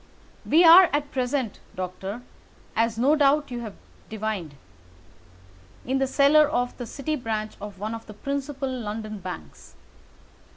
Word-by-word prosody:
We 330 Hz, +3 st, +5 dB
are 350 Hz, +2 st, +9 dB
at 290 Hz, 0 st, -1 dB
present, 255 Hz, -3 st, -2 dB, 0.2 s
Doctor—as 205 Hz, +4 st, -5 dB
no 270 Hz, +6 st, +4 dB
doubt 290 Hz, -1 st, +2 dB
you 240 Hz, -, -4 dB
have 220 Hz, -4 st, -7 dB, 0.3 s
divined—in 210 Hz, -8 st, -4 dB, 1.4 s
the 270 Hz, -, +1 dB
cellar 290 Hz, +3 st, +5 dB
of 245 Hz, -4 st, -1 dB
the 245 Hz, -, -6 dB
City 300 Hz, +5 st, -3 dB
branch 220 Hz, -5 st, -4 dB
of 205 Hz, -1 st, -8 dB
one 215 Hz, +3 st, -4 dB
of 225 Hz, 0 st, -8 dB
the 215 Hz, -, -10 dB
principal 275 Hz, +3 st, -4 dB
London 215 Hz, -4 st, -5 dB
banks. 80 Hz, -, -9 dB
240 Hz, 130 wpm, -25 LUFS, 215-280 Hz, 1.4 s, are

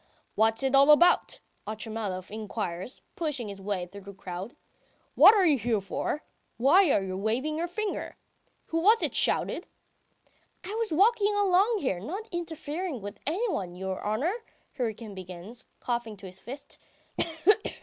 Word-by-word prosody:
"What's 225 Hz, +3 st, +2 dB
it 265 Hz, 0 st, +1 dB
all 275 Hz, +1 st, +6 dB
about?" 345 Hz, +4 st, +5 dB, 0.3 s
Otchumyelov 215 Hz, -4 st, -4 dB
inquires, 210 Hz, -1 st, -5 dB
pushing 290 Hz, -9 st, -3 dB
his 195 Hz, -1 st, -7 dB
way 195 Hz, -2 st, -2 dB
through 200 Hz, +3 st, -11 dB
the 200 Hz, +1 st, -10 dB
crowd. 185 Hz, +3 st, -7 dB, 0.6 s
"What 425 Hz, -, +9 dB
are 390 Hz, -3 st, +4 dB
you 295 Hz, -6 st, +4 dB
here 225 Hz, -2 st, +1 dB
for? 200 Hz, +9 st, -3 dB, 0.3 s
Why 315 Hz, +9 st, +5 dB
are 195 Hz, -, +3 dB
you 185 Hz, -1 st, -4 dB
waving 235 Hz, +10 st, -1 dB
your 335 Hz, +2 st, -1 dB
finger...? 425 Hz, +4 st, -4 dB, 0.5 s
Who 330 Hz, -, 0 dB
was 430 Hz, +7 st, +5 dB
it -, -, 0 dB
shouted?" -, -, +1 dB, 1.0 s
"I 380 Hz, +3 st, -6 dB
was 450 Hz, -3 st, -2 dB
walking 410 Hz, +4 st, +4 dB
along 405 Hz, +3 st, +3 dB
here, 195 Hz, -, 0 dB
not 380 Hz, -, -5 dB
interfering 330 Hz, -2 st, -4 dB
with 205 Hz, +1 st, -8 dB
anyone, 315 Hz, -, -1 dB
your 190 Hz, 0 st, -4 dB
honour," 250 Hz, -, 0 dB, 0.4 s
Hryukin 225 Hz, -3 st, -3 dB
begins, 185 Hz, +5 st, -8 dB
coughing 235 Hz, -2 st, -2 dB
into 200 Hz, -1 st, -12 dB
his 185 Hz, 0 st, -8 dB
fist. 270 Hz, +4 st, -9 dB
240 Hz, 150 wpm, -28 LUFS, -, 1.0 s, What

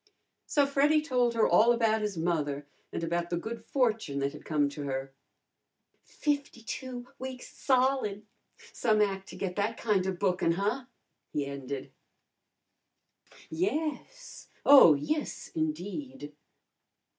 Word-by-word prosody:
So 290 Hz, -2 st, +3 dB
Freddy 280 Hz, +2 st, +3 dB
told 250 Hz, -6 st, +1 dB
her 225 Hz, -, +4 dB
all 230 Hz, +2 st, +5 dB
about 225 Hz, -2 st, +2 dB
his 210 Hz, -4 st, -2 dB
mother, 150 Hz, -4 st, -1 dB, 0.3 s
and -, -, -4 dB
about 170 Hz, +1 st, -1 dB
the 175 Hz, -, -1 dB
good 225 Hz, +7 st, -6 dB
fortune 225 Hz, -, 0 dB
that 140 Hz, +1 st, -1 dB
had 150 Hz, -, -11 dB
come 150 Hz, -2 st, +2 dB
to 145 Hz, +1 st, -7 dB
her. 135 Hz, 0 st, -4 dB, 0.9 s
"Fifty 285 Hz, -5 st, -3 dB
two 250 Hz, +1 st, -6 dB
weeks 260 Hz, -1 st, -7 dB
solid! 255 Hz, -6 st, +1 dB, 0.5 s
Some 220 Hz, -3 st, +2 dB
ac' 195 Hz, -2 st, 0 dB
to -, -, -10 dB
get 180 Hz, -2 st, -3 dB
that 210 Hz, +3 st, 0 dB
kinda 195 Hz, -4 st, +1 dB
bookin, 180 Hz, -2 st, +1 dB
huh?" 210 Hz, +8 st, -1 dB, 0.5 s
he 145 Hz, -1 st, -1 dB
ended. 140 Hz, -1 st, -6 dB, 1.6 s
"Yes! 305 Hz, -, -3 dB, 0.2 s
Oh, 270 Hz, -, +9 dB
yes, 300 Hz, -, -3 dB
indeed!" 165 Hz, -, -4 dB
210 Hz, 125 wpm, -29 LUFS, 160-255 Hz, 1.6 s, Oh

